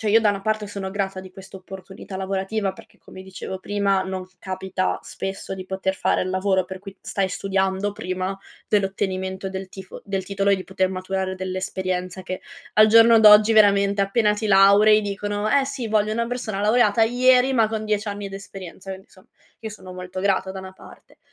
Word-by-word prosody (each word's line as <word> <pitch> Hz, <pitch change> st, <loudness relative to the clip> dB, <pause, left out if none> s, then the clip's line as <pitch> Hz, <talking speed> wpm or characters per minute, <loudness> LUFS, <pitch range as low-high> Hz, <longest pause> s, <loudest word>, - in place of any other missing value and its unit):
cioè, 215 Hz, -3 st, 0 dB
io 225 Hz, -, +6 dB
da 215 Hz, -, +3 dB
una 200 Hz, -1 st, 0 dB
parte 215 Hz, -1 st, -1 dB
sono 195 Hz, -2 st, -5 dB
grata 195 Hz, -2 st, -2 dB
di 185 Hz, 0 st, -10 dB
questa 195 Hz, 0 st, -11 dB
opportunità 190 Hz, +1 st, -10 dB
lavorativa 195 Hz, +1 st, -2 dB
perché -, -, -17 dB
come 185 Hz, -, -13 dB
dicevo 190 Hz, 0 st, -7 dB
prima 200 Hz, 0 st, 0 dB
non 190 Hz, -1 st, -4 dB
capita 190 Hz, 0 st, -2 dB
spesso 195 Hz, 0 st, -6 dB
di 185 Hz, 0 st, -8 dB
poter 190 Hz, 0 st, -2 dB
fare -, -, +1 dB
il 185 Hz, -, -3 dB
lavoro 190 Hz, 0 st, +1 dB
per 190 Hz, +1 st, -8 dB
cui 195 Hz, 0 st, -11 dB
stai 195 Hz, -1 st, -2 dB
studiando 195 Hz, +1 st, -1 dB
prima 185 Hz, 0 st, -4 dB, 0.3 s
dell'ottenimento 190 Hz, -1 st, -1 dB
del 190 Hz, 0 st, -6 dB
tifo 190 Hz, -1 st, -10 dB
del 195 Hz, -2 st, -3 dB
titolo 200 Hz, +1 st, 0 dB
e -, -, +5 dB
di 190 Hz, -, -6 dB
poter 190 Hz, 0 st, -1 dB
maturare 190 Hz, 0 st, -3 dB
dell'esperienza 185 Hz, 0 st, -4 dB
che 185 Hz, 0 st, -5 dB, 0.3 s
al 215 Hz, 0 st, +7 dB
giorno 230 Hz, +1 st, +7 dB
d'oggi 215 Hz, 0 st, +7 dB
veramente 200 Hz, -1 st, +4 dB
appena 210 Hz, +2 st, +2 dB
ti 215 Hz, +1 st, -3 dB
laurei 205 Hz, +2 st, +6 dB
dicono: 205 Hz, +1 st, -3 dB
"Eh 280 Hz, -1 st, +3 dB
sì, 265 Hz, -4 st, -4 dB
voglio 215 Hz, 0 st, +1 dB
una 235 Hz, +1 st, -1 dB
persona 240 Hz, -5 st, -3 dB
laureata 215 Hz, 0 st, +3 dB
ieri, 250 Hz, +2 st, +4 dB
ma 225 Hz, -4 st, +3 dB
con 220 Hz, 0 st, -4 dB
10 215 Hz, 0 st, -1 dB
anni 205 Hz, -1 st, -4 dB
d'esperienza". 195 Hz, -1 st, -9 dB
Quindi 190 Hz, +1 st, -15 dB
insomma, 185 Hz, +2 st, -21 dB, 0.3 s
io 220 Hz, -, -6 dB
sono 190 Hz, -4 st, -10 dB
molto 185 Hz, 0 st, -7 dB
grata 190 Hz, -1 st, 0 dB
da 190 Hz, -, -7 dB
una 190 Hz, 0 st, -10 dB
parte. -, -, -17 dB
195 Hz, 190 wpm, -23 LUFS, 190-210 Hz, 0.3 s, al